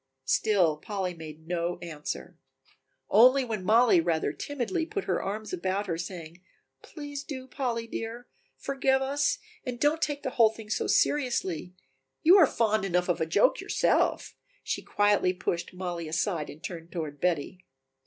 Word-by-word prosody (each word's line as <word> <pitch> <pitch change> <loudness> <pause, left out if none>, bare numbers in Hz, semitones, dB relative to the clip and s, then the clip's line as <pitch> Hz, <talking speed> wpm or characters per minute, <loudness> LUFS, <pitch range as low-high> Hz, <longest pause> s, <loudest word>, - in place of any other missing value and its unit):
Still 180 -2 +2
Polly 190 +1 -3
made 160 -1 -11
no 175 0 -1
answer, 150 - -6 0.7
only 255 +5 +6
when 220 -5 -4
Mollie 220 -3 +5
rather 160 -3 0
timidly 290 - -2
put 400 +4 -3
her - - -1
arms 215 +2 -4
about 190 +3 -1
her 170 -4 -2
saying: 170 -1 -7 0.4
"Please 290 -2 -7
do, 260 -3 -7
Polly 245 -3 -3
dear, 230 +1 -6 0.3
forgive 270 -1 +1
us 285 +2 +1 0.3
and 250 -3 -5
don't 300 +3 +2
take 290 -2 -1
the 260 - -2
whole 230 -3 +5
thing 220 -1 -10
so - - 0
seriously, 190 - +1 0.5
you 345 +4 +8
are 335 -7 +7
fond 215 -4 +1
enough 180 -1 0
of 175 - 0
a 160 - +1
joke - - +3
yourself," - - +1 0.3
she - - -2
quietly 205 -3 +2
pushed 180 -1 -3
Mollie 175 -3 -5
aside 165 -1 -1
and 155 - -11
turned 170 -2 -7
toward 155 -5 -5
Betty. 180 +1 -1
200 Hz, 155 wpm, -28 LUFS, 170-255 Hz, 0.7 s, you